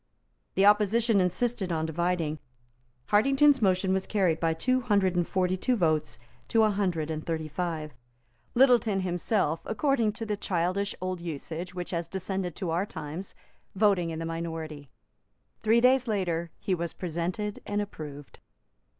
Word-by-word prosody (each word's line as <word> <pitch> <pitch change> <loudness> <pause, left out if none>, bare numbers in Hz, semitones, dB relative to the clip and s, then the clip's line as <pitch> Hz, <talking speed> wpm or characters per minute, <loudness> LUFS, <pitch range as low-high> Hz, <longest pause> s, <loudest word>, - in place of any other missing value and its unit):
The 195 - +4
opposition 210 +1 +4
insisted 190 +2 0
on 160 -1 0
dividing. 165 -1 -1 0.7
Hartington's 275 +5 +4
motion 190 -1 +2
was 190 0 -1
carried 185 -6 +1
by 165 -1 +1
two 255 +10 +1
hundred 200 -6 +2
and 175 -1 +1
forty 185 -1 +1
two 250 +7 +1
votes 155 - 0 0.3
to 225 -1 +3
a 215 - +4
hundred 180 -6 -1
and 155 0 -4
thirty 160 -2 -3
five, 155 -2 -3 0.6
Littleton 235 -6 +4
himself, 175 -2 0
according 230 -2 +1
to 225 +1 -5
the 210 -1 -1
childish 190 +1 -1
old 185 -1 -3
usage 170 +2 -5
which 180 -1 -4
has 170 -2 -2
descended 190 -1 -3
to 180 -5 -3
our 180 +5 0
times, 160 +3 -7 0.4
voting 195 -4 +3
in 160 - -4
the 165 - -4
minority. 160 -3 -5 0.7
Three 225 +2 +4
days 255 0 +4
later, 175 -6 -1
he 190 - -2
was 170 -1 -2
presented 180 +4 -3
and 205 0 -1
approved. 150 -8 -7
185 Hz, 150 wpm, -28 LUFS, 165-210 Hz, 0.7 s, The